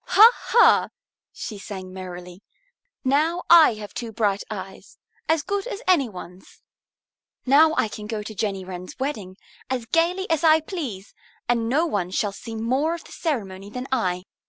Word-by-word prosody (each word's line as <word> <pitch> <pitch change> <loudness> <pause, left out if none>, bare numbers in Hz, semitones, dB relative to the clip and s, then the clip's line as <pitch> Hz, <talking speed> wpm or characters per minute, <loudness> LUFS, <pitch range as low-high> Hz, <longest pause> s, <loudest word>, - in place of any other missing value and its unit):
"Ha, 445 +3 +8
ha!" 475 - +4 0.4
she 210 -3 -7
sang 190 -2 -8
merrily. 180 0 -9 0.6
"Now 310 +6 +1
I 325 -9 +8
have 210 -1 -9
two 235 -2 -5
bright 205 -3 0
eyes, - - -8 0.3
as 320 -2 +2
good 400 +5 -2
as - - -6
any 315 -10 +3
one's. 180 -1 -12 0.8
Now 310 +4 +5
I - - +2
can 210 0 -8
go 215 -1 -4
to 215 - -7
Jenny 195 -3 -3
Wren's 185 0 -8
wedding 215 -9 -4 0.3
as 255 -3 -2
gayly 345 - +1
as 320 -1 +1
I 320 -1 +6
please, 285 - -6 0.3
and 230 -1 +1
no 300 +7 +2
one 200 - -2
shall 200 +2 -1
see 225 +3 -8
more 260 +9 0
of 340 - -10
the - - -16
ceremony 200 - -4
than 250 +4 -6
I. 180 -8 0
230 Hz, 165 wpm, -23 LUFS, 195-315 Hz, 0.8 s, Ha